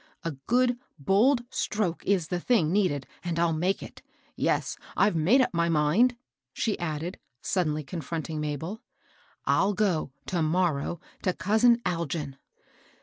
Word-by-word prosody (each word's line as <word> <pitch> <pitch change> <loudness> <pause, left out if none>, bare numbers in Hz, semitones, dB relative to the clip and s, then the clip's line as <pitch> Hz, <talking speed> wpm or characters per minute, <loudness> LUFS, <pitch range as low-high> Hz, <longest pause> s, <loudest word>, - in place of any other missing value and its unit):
A 165 - -2 0.2
good, 245 0 +3 0.2
bold 220 - +3
stroke 205 -6 -1
is 185 -6 +2
the 180 - -1
thing 175 -6 +2
needed, 180 -9 +1 0.2
and 170 -2 -2
I'll 170 -1 +2
make 180 +5 0
it. - - -11 0.3
Yes - - 0 0.2
I - - +5
I've 205 - +1
made 185 - +4
up 255 - 0
my 170 0 +1
mind," 165 +11 +3 0.4
she 220 - -1
added, 165 +1 -3 0.2
suddenly 155 -5 0
confronting 160 0 -4
Mabel. 155 +8 -4 0.3
'* - - -33
I'll 200 +1 +3
go, 185 -9 +1
to 175 -3 -1
morrow, 165 -1 0 0.2
to 185 - +1
cousin 235 +5 +3
Algin." 165 -5 -2
175 Hz, 145 wpm, -27 LUFS, 155-205 Hz, 0.4 s, I